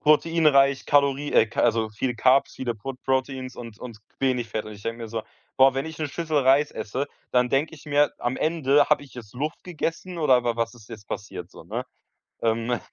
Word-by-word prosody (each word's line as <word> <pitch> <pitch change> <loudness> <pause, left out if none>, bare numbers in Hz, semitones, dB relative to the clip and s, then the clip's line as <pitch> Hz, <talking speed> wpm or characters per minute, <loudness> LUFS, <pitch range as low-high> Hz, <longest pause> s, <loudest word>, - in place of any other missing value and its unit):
proteinreich, 150 -3 +4
Kalorie 140 0 +2
äh, - - +5
ca 110 - -3
also 110 -1 +2
viel 120 +4 -2
Carbs, 130 +4 +3
viele 120 -3 -2
Prot 125 +4 -7
Proteins 130 -1 -1
und 115 -3 -9
und 120 -3 -8 0.2
wenig 125 -3 0
Fett“, 110 -1 -2
und 110 - -8
ich 100 -1 -12
denke 115 +1 -4
mir 115 - -6
so: 110 0 -4 0.3
„Boah, 135 0 +6
wenn 135 +4 -2
ich 160 - -7
'ne 155 - -2
Schüssel 155 +1 -1
Reis 135 +2 +4
esse, 135 +7 -3 0.2
dann 125 0 +3
denke 145 +5 0
ich 150 - -16
mir 145 0 +3
am 120 +2 -2
Ende, 145 -3 +3
habe - - +4
ich 140 - -17
jetzt 115 -5 -10
Luft 150 +5 -4
gegessen 175 +1 -4
oder 130 -6 +4
wa 120 -1 0
was 115 +1 -1
ist 110 -3 -16
jetzt 110 -2 -10
passiert?“ 105 - -6
So, - - -13
ne? - - -4 0.6
Ähm 115 +1 0
130 Hz, 215 wpm, -25 LUFS, 115-145 Hz, 0.6 s, Boah